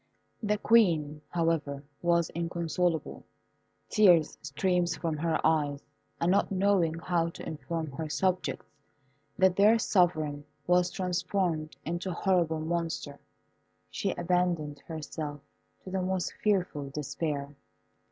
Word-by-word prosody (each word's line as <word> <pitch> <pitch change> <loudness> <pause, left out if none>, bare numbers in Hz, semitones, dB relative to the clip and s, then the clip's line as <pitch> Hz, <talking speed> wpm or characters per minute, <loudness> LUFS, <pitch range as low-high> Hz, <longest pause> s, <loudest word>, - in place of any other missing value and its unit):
The 210 -1 +1
Queen, 165 -10 +3
however, 160 -5 0 0.2
was 170 -1 +2
inconsolable; 170 -1 -1 0.6
tears 180 -8 +5
streamed 175 +5 0
from 165 -3 -1
her 160 +1 0
eyes, 145 -3 +1 0.4
and 170 +2 +2
not 200 - +2
knowing 190 -4 +2
how 165 0 0
to - - -9
inform 160 0 -4
her 155 +3 -5
subjects 185 +3 -1 0.7
that 190 -1 +4
their 210 +3 +6
sovereign 160 -9 +1 0.2
was 180 +1 +3
transformed 180 -3 -1
into 175 +3 -3
a - - -2
horrible 170 -3 +1
monster, 165 -3 -3 0.7
she - - -1
abandoned 175 -4 0
herself 155 -2 -5 0.4
to 185 - -8
the 190 0 0
most 185 0 -1
fearful 180 -9 0
despair. 145 0 -3
170 Hz, 115 wpm, -29 LUFS, 155-180 Hz, 0.7 s, their